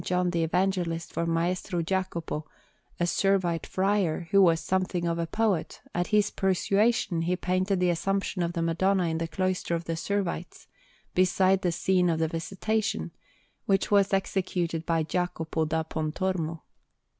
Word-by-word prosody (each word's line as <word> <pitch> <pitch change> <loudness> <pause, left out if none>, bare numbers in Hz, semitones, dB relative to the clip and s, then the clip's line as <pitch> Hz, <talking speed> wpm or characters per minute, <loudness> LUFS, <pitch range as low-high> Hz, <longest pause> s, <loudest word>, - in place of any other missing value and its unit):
John 180 0 +1
the 170 -1 0
Evangelist 175 -1 0
for 170 - -1
Maestro 175 +1 0
Jacopo, 170 -4 -2 0.5
a - - +1
Servite 175 -1 +1
friar, 190 -4 0
who 195 - +6
was 165 -3 +5
something 180 +1 -1
of 170 0 -1
a 165 - -1
poet, 205 -3 0
at 175 0 0
his 210 -1 +2
persuasion 195 0 +1
he 175 +2 +1
painted 185 +2 0
the 180 -1 +3
Assumption 195 +2 -1
of 170 0 -1
the 170 -1 -1
Madonna 185 +3 +2
in 160 0 -1
the 165 - -2
cloister 185 0 -1
of 165 - -3
the 165 - -2
Servites, 180 -1 -3 0.5
beside 185 +1 +3
the 175 - +1
scene 180 +1 +2
of 165 - +1
the 160 0 +1
Visitation, 180 - -2 0.6
which 195 +1 +1
was 200 -1 +4
executed 180 -4 -1
by 165 -2 +2
Jacopo 160 -1 -1
da 160 +1 0
Pontormo. 160 +1 -2
180 Hz, 155 wpm, -27 LUFS, 165-190 Hz, 0.6 s, who